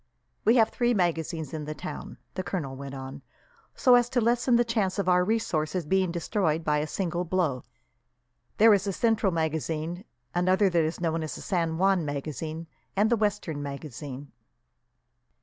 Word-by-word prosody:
"We 225 - +5
have 225 -2 +5
three 240 0 +1
magazines 165 -4 -1
in 155 -2 -4
the 155 +1 -5
town," 185 - -7 0.2
the 185 - -2
colonel 175 -7 -4
went 140 0 -7
on, 135 0 -7 0.5
"so 250 - +5
as 245 -1 +5
to 250 - +1
lessen 240 +2 +3
the 240 0 +4
chance 215 -5 0
of 200 -2 -1
our 180 0 +4
resources 180 -5 -1
being 190 +2 +1
destroyed 170 -2 0
by 150 -1 +1
a 150 - -2
single 175 +1 -2
blow. 170 -7 -1 0.9
There 220 0 +7
is 195 -1 +2
the 200 - -1
Central 220 -2 +2
magazine, 160 +2 -2 0.3
another 185 +2 +3
that 170 -2 +3
is 160 +2 -2
known 165 -1 0
as 155 - -4
the - - -8
San 165 -5 -1
Juan 190 -1 +3
magazine, 155 +3 -4 0.3
and 210 +3 +3
the - - +5
Western 200 -8 -1
magazine." 140 -1 -7
175 Hz, 170 wpm, -27 LUFS, 155-200 Hz, 0.9 s, There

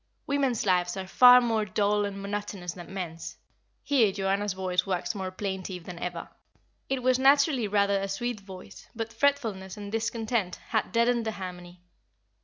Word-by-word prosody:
Women's 275 -6 0
lives 180 -1 +1
are 190 - -4
far 250 +6 +8
more 225 -3 +1
dull 205 0 +1
and 200 -1 -5
monotonous 200 -3 -4
than 175 -2 -11
men's;" 175 -4 -6 0.5
here 245 -8 +3
Joanna's 195 +1 -1
voice 185 -1 0
waxed 185 -2 -2
more 190 -3 -4
plaintive 185 -2 -5
than 170 0 -8
ever 175 -1 -5 0.6
it 265 -2 -1
was 255 0 +3
naturally 275 -3 +4
rather 200 -1 +2
a 195 - -2
sweet 235 +3 -3
voice, 185 - -12
but 225 0 -4
fretfulness 225 -7 0
and 205 -1 -7
discontent 225 -3 -1
had 220 -2 0
deadened 235 0 +2
the 220 - -1
harmony. 180 -2 -8
200 Hz, 160 wpm, -28 LUFS, 185-230 Hz, 0.6 s, far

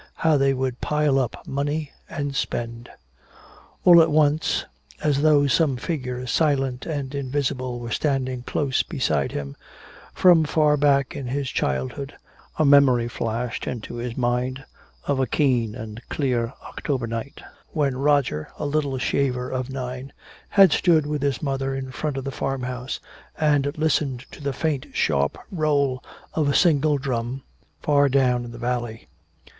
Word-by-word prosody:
How 160 -1 +2
they 135 -1 +3
would 130 -1 -2
pile 150 -2 +2
up 125 -3 -3
money 145 +2 -2 0.2
and 145 -1 -3
spend! 120 -2 -3 1.0
All 175 -2 +9
at 165 - +4
once, 150 0 +2 0.4
as 145 -2 +2
though 150 -2 +5
some 140 -1 +2
figure 125 -4 -3
silent 135 -2 0
and 145 -4 -3
invisible 130 -2 -2
were 120 -1 -6
standing 130 -3 -1
close 135 +1 0
beside - - -1
him, 70 -1 -5 0.6
from 175 -3 +5
far 150 0 +3
back 140 -2 +2
in 135 - -5
his 135 +1 -2
childhood 70 - -2 0.4
a 155 - +3
memory 135 -4 +5
flashed 115 0 -3
into 120 -1 -5
his 120 0 -5
mind 125 +2 -1 0.4
of 140 -2 0
a 130 - +1
keen 120 -5 +1
and 110 -2 -7
clear 125 -5 0
October 130 -5 -3
night, 115 +4 -5 0.3
when 140 -4 0
Roger, 135 - +1
a - - -3
little 145 -2 0
shaver 125 -1 0
of 130 0 -3
nine, 130 0 -5 0.4
had 195 -4 +6
stood 160 -3 +3
with 150 -1 -2
his 140 -2 -1
mother 135 -1 -1
in 130 -1 -5
front 145 +2 -3
of 135 - -3
the 135 - -4
farmhouse 125 -1 -3 0.4
and 145 -2 +2
listened 150 -5 +1
to - - -11
the 140 -1 -1
faint 140 0 -2
sharp 70 -2 +1
roll 145 -6 +1 0.3
of 150 -3 +1
a 140 - +1
single 150 -4 +4
drum 130 -1 -3 0.4
far 145 -1 +4
down 125 -2 +2
in 120 - -8
the 120 - -9
valley. 120 -2 -3
135 Hz, 150 wpm, -24 LUFS, 125-145 Hz, 1.0 s, All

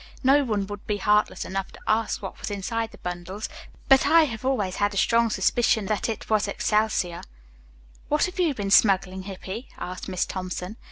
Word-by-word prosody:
No 275 +2 +5
one 210 -6 -1
would 205 0 -9
be 210 - 0
heartless 210 +2 +2
enough 195 0 -4
to - - -13
ask 220 0 0
what - - -7
was - - -4
inside 225 +3 -2
the - - -14
bundles, 180 +4 -5 0.4
but 270 -1 +6
I 330 0 +7
have 230 -6 -4
always 215 -9 0
had 205 -1 0
a - - -3
strong 230 +3 +3
suspicion 215 +1 +2
that 210 +3 -1
it 225 - -4
was 215 -1 +2
excelsior." 210 -4 0 0.9
"What 300 +1 +2
have 365 +1 -6
you 330 -6 +2
been 200 -3 -3
smuggling, 190 -2 +4
Hippy?" 195 +5 -7
asked 180 +1 -6
Miss 185 -1 0
Thompson. 185 +2 -5
210 Hz, 185 wpm, -25 LUFS, 190-230 Hz, 0.9 s, I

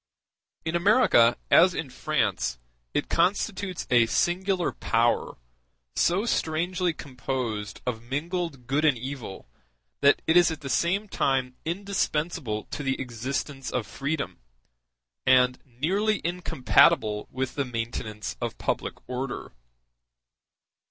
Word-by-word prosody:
In 160 +1 -1
America, 170 - +5
as 180 +1 +6
in 140 -5 -4
France, 65 - -1 0.3
it - - -1
constitutes 190 -1 0
a 120 -2 +5
singular 180 - +1
power, 115 +1 +1 0.6
so 185 +6 +2
strangely 175 -1 0
composed 125 -7 -4
of 120 -3 -2
mingled 145 +2 -3
good 140 +5 0
and 150 -5 +4
evil 125 - -7 0.5
that 140 - +4
it 160 - +3
is 175 0 +7
at 160 -2 -5
the 135 - -6
same 195 +8 +1
time 130 -8 0
indispensable 160 - -1
to - - -4
the 135 -2 -1
existence 135 +2 -4
of 120 -3 -2
freedom, 140 +5 -3 0.9
and 125 0 +5
nearly 190 - 0
incompatible 120 -10 +3
with 130 0 -3
the 140 - 0
maintenance 115 -3 -4
of - - -3
public - - -2
order. 125 0 -4
140 Hz, 115 wpm, -26 LUFS, 125-175 Hz, 0.9 s, is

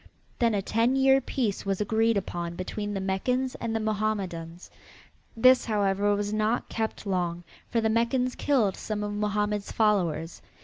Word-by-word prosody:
Then 230 -3 +3
a 195 - -1
ten 230 +6 +1
year 270 0 +5
peace 235 -6 -2
was 195 -1 -1
agreed 220 +1 +2
upon 175 -3 -4
between 205 +3 -4
the - - -1
Meccans 250 +7 -1
and 230 -1 -2
the - - +1
Mohammedans. 195 -6 -3 0.7
This, 255 +3 +6
however, 205 -2 +1
was 205 0 -2
not 215 +2 0
kept 220 -1 -3
long, 175 -3 -1 0.3
for 230 - +1
the 220 - +2
Meccans 235 +3 +1
killed 235 -10 +1
some 210 -1 -4
of 205 0 -3
Mohammed's 210 0 -1
followers. 175 -7 0
210 Hz, 160 wpm, -27 LUFS, 195-230 Hz, 0.7 s, This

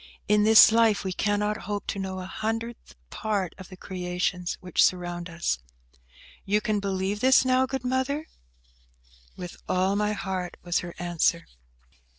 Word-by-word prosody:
In 210 0 +4
this 220 0 +9
life 225 -2 +3
we 190 -1 -2
cannot 210 +2 0
hope 205 -1 -3
to 200 - -3
know 190 -1 -4
a - - -6
hundredth 225 +4 -4 0.2
part 205 -5 -2
of 190 - -10
the 185 - -11
creations 180 -1 -3
which 180 -2 +2
surround 175 -1 0
us. 165 - -1 0.8
You 205 +2 +2
can 215 -1 -1
believe 195 0 -2
this 260 +2 +5
now, 255 0 +3
good 265 -1 -4
Mother?" 260 +4 -1 1.1
"With 175 -1 -8
all 185 +2 +2
my 210 +1 +1
heart," 190 -3 -4
was 175 -1 0
her 175 -1 -7
answer. 175 -1 0
195 Hz, 155 wpm, -26 LUFS, 180-220 Hz, 1.1 s, this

